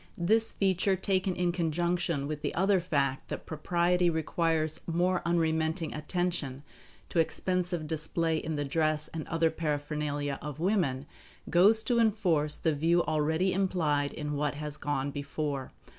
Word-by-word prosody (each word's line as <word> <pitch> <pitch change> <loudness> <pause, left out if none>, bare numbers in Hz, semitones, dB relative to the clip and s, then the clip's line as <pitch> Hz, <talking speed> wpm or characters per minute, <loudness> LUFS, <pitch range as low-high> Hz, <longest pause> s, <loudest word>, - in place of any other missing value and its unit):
This 220 +6 +3
feature 190 0 +1
taken 190 0 0
in 175 -1 +1
conjunction 170 -2 0
with 150 0 -4
the - - -3
other 190 +2 +3
fact 140 -6 -1
that - - -6
propriety 175 +3 +1
requires 160 -1 0
more 175 +2 +1
unremitting 160 -1 0
attention 150 -4 -2 0.5
to 170 - 0
expensive 175 0 0
display 160 +1 -1
in 155 0 -3
the 145 0 -1
dress 155 +1 0
and 160 -2 -6
other 165 -1 +1
paraphernalia 145 -2 -2
of 150 0 -6
women, 165 -8 +1 0.5
goes 210 +6 +5
to 240 -2 +1
enforce 180 -10 +2
the 160 - 0
view 165 +4 +2
already 160 +4 +1
implied 160 -7 +1
in 150 -1 -4
what 145 0 -1
has 150 0 -5
gone 145 -2 -2
before. 140 -1 -4
160 Hz, 145 wpm, -30 LUFS, 150-180 Hz, 0.5 s, goes